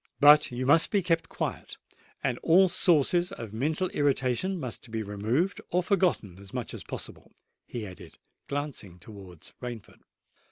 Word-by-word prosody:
"But 150 +1 +7
you 125 +1 -3
must 160 +5 +5
be 200 -3 +1
kept 165 -2 0
quiet—and 125 -1 -5
all 185 +3 +5
sources 175 +1 +2
of 115 - -8
mental 155 +10 0
irritation 145 +5 0
must 125 -3 -6
be 110 -1 -3
removed 110 - -1
or 180 +1 +1
forgotten 175 - +1
as 100 -1 -12
much - - -4
as - - -7
possible," - - -8 0.3
he 115 -3 -5
added, 95 -3 -11 0.3
glancing 140 - -4
towards 95 -3 -13
Rainford. 120 -4 -8
135 Hz, 145 wpm, -28 LUFS, 110-170 Hz, 0.3 s, But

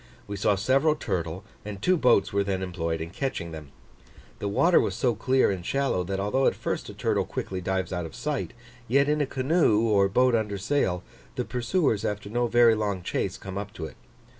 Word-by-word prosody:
We 100 - -5
saw 100 +1 +2
several 135 +9 +2
turtle 85 - -3 0.2
and 105 -2 -6
two 185 - +3
boats 125 - +3
were 100 0 +2
then 95 -1 -2
employed 85 -3 -3
in 80 +1 -5
catching 95 -9 -3
them. 75 -3 -9 0.7
The 100 - -2
water 165 - +4
was - - -2
so 125 -3 +1
clear 130 +2 +2
and 95 -3 -4
shallow, 135 -5 0
that 95 +2 -3
although 115 +7 +1
at - - +2
first - - -3
a - - -9
turtle - - 0
quickly 95 -1 -4
dives 95 +1 -2
out 90 -2 -2
of - - -13
sight, 150 -2 -3 0.3
yet 140 +4 +3
in 150 0 +1
a 145 - 0
canoe 130 -4 +2
or 100 -2 +3
boat 125 +5 +3
under 105 -3 0
sail, 95 -5 0 0.3
the - - -2
pursuers 125 - 0
after 105 -1 -3
no 120 +1 +1
very 120 -1 +5
long 100 -4 -2
chase - - -2
come 95 0 -6
up 105 +1 -7
to 80 - -6
it. - - -9
105 Hz, 210 wpm, -26 LUFS, 95-130 Hz, 0.7 s, very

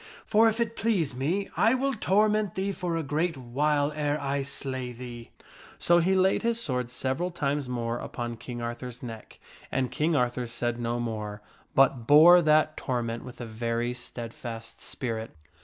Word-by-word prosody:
For 225 +1 +5
if 220 +1 -3
it 230 -1 0
please 185 - 0
me 170 +10 -1
I 225 +4 +4
will 275 +1 0
torment 210 -1 +2
thee 195 +1 -1
for 180 -3 -2
a 165 - -1
great 155 +3 -1
while 145 +4 +1
ere 150 0 -1
I 140 0 -1
slay 130 -2 -3
thee." 120 -1 -9 0.5
So 175 0 +4
he 185 +3 +2
laid 190 +1 +3
his 235 0 +1
sword 125 - -1
several 135 +7 -2
times 145 -5 -2
more 120 -1 -2
upon 120 -1 -5
King 120 0 -6
Arthur's 120 +1 -6
neck, 115 -3 -9 0.3
and 130 -2 0
King 160 +2 +1
Arthur 125 -2 0
said 120 +1 -2
no 120 0 -1
more, 105 -3 -4 0.3
but 130 -3 +4
bore 165 +5 +9
that 155 -1 +3
torment 120 -3 -2
with 125 -1 -10
a 120 - -5
very 115 +2 -2
steadfast 115 -2 -7
spirit. 115 -5 -4
135 Hz, 170 wpm, -28 LUFS, 120-170 Hz, 0.5 s, bore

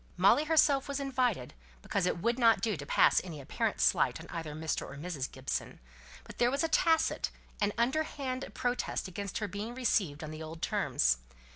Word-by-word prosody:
Molly 200 +11 +5
herself 295 -3 +4
was 280 0 -2
invited, 250 - 0 0.3
because 190 -2 0
it - - 0
would 235 +8 0
not 230 -2 +5
do 220 -3 0
to 145 -2 -7
pass - - +5
any 165 -5 -7
apparent 135 - -2
slight - - +3
on - - -9
either 160 -3 -5
Mr. 160 0 -2
or - - -8
Mrs. 150 -4 -4
Gibson; - - -4 0.4
but - - -13
there 240 - +4
was 275 +4 0
a - - +2
tacit 325 0 +2 0.3
and 205 0 +2
underhand 265 +1 -1
protest 245 -4 -1
against 195 +1 -5
her 215 - -2
being 205 +5 -5
received 190 - 0
on 155 - -6
the 155 0 -7
old 160 +1 -7
terms. - - +2
215 Hz, 185 wpm, -31 LUFS, 160-260 Hz, 0.4 s, Molly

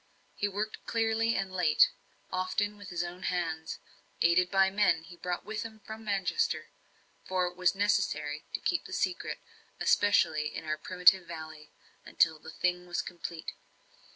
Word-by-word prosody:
He 205 - -1
worked 205 +2 -3 0.2
early 225 0 +2
and 190 -1 -2
late 175 -5 +5 0.4
often 185 +3 0
with 205 -2 -10
his 175 -1 -2
own 175 +1 -7
hands 165 -3 -2 0.5
aided 180 +1 +4
by 195 -1 +4
the - - -15
men 175 -6 +3
he 175 +1 -12
brought 175 +1 -4
with 215 0 -3
him 220 -1 -7
from 220 +1 -8
Manchester. 210 - 0 0.5
For 185 -1 0
it 180 0 -4
was 180 +1 +2
necessary 155 -7 0
to - - -1
keep 350 - 0
the - - -8
secret - - -1 0.4
especially 155 -7 +3
in - - -5
our 155 0 -2
primitive 180 +1 +5
valley 155 -2 -8 0.3
until 160 -1 +2
the 160 - -11
thing 180 +2 -1
was 175 - -1
complete. 170 -2 -6
180 Hz, 160 wpm, -30 LUFS, 165-205 Hz, 0.5 s, late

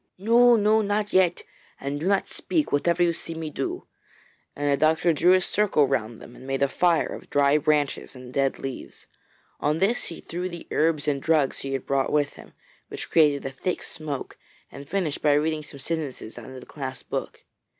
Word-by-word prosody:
'No! 235 +5 +5
no! 215 0 +3
not 210 0 -1
yet. 185 -2 +3 0.4
And 140 +1 -3
do 165 - -2
not 195 -1 +2
speak, 315 -3 -1
whatever 170 +4 +2
you 170 -1 +2
see 165 0 -7
me 160 -1 -5
do,' 135 -2 -4 0.7
and 145 0 0
the - - +4
doctor 160 +3 +3
drew 170 +5 +4
a 185 - +4
circle 185 -7 +2
round 120 -4 -2
them 120 - -13
and 130 - -12
made 135 0 0
a - - +4
fire 170 +4 +2
of - - -10
dry 145 +1 +3
branches 150 -2 0
and 125 0 -11
dead 135 -1 +1
leaves. 135 -2 -7 0.5
On 150 +2 +1
this 200 +7 +1
he 165 - -7
threw 180 +2 -5
the 170 -2 -9
herbs 155 -1 +1
and 140 -2 0
drugs 155 -4 +2
he 135 0 -4
had 135 - -3
brought 135 -1 0
with 145 -1 +1
him, - - -15 0.3
which - - -8
created 150 -3 +4
a 135 - -3
thick 175 +7 -3
smoke, 150 -4 -6 0.3
and 140 0 -11
finished 180 -7 -1
by 150 - +4
reading 155 +1 +1
some 145 -2 -11
sentences 145 -6 -4
out 120 +1 -10
of 130 0 -9
the - - -13
clasped 130 -3 -7
book. - - -4
150 Hz, 200 wpm, -25 LUFS, 140-175 Hz, 0.7 s, No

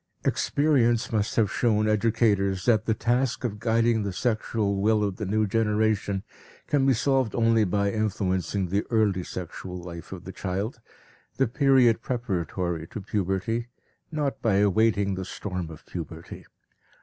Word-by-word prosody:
Experience 130 -5 +2
must 105 -2 0
have 105 -3 +2
shown 110 -3 +2
educators 100 -3 +2
that 110 -2 +3
the 110 - +2
task 125 +3 0
of 105 -4 -3
guiding 115 0 +2
the 100 -1 -2
sexual 110 -1 -1
will 105 0 +3
of 100 -2 -2
the 105 - -4
new 110 +2 +1
generation 105 -2 0 0.4
can 140 -2 +2
be 135 - +5
solved 130 -1 +1
only 115 -1 +3
by 100 +1 +1
influencing 100 -3 -1
the 100 +3 +1
early 105 -5 +2
sexual 90 +1 -7
life 85 -1 -9
of 90 -3 -7
the 95 - -7
child, 100 +5 -4 0.6
the 135 - +3
period 125 -3 +4
preparatory 90 -8 -2
to - - -7
puberty, 100 +4 -2 0.4
not 150 -3 -2
by 110 -4 +2
awaiting 100 0 +3
the 95 0 -3
storm 90 -2 -5
of 80 -2 -12
puberty. 80 -1 -8
105 Hz, 150 wpm, -26 LUFS, 95-115 Hz, 0.6 s, be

